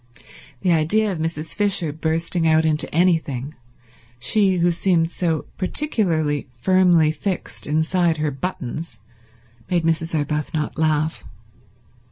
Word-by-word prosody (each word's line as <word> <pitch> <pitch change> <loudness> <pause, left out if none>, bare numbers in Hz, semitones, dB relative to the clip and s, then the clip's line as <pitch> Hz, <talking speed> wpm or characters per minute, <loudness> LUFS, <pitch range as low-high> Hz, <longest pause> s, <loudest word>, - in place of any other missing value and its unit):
The 185 - +2
idea 205 +7 +2
of 175 - -4
Mrs. 160 -1 -4
Fisher 200 -7 +1
bursting 165 +2 0
out 160 0 +4
into 155 -1 0
anything, 155 -5 +1 0.6
she 190 - +3
who 175 0 +3
seemed 170 -1 +1
so 165 -4 -1
particularly 170 - 0
firmly 175 +2 +3
fixed 180 +4 -4
inside 160 +2 +1
her 150 -1 -1
buttons, 135 -3 -5 0.7
made 175 -2 +1
Mrs. 165 0 0
Arbuthnot 150 +1 -2
laugh. 155 0 0
165 Hz, 115 wpm, -21 LUFS, 155-180 Hz, 0.7 s, out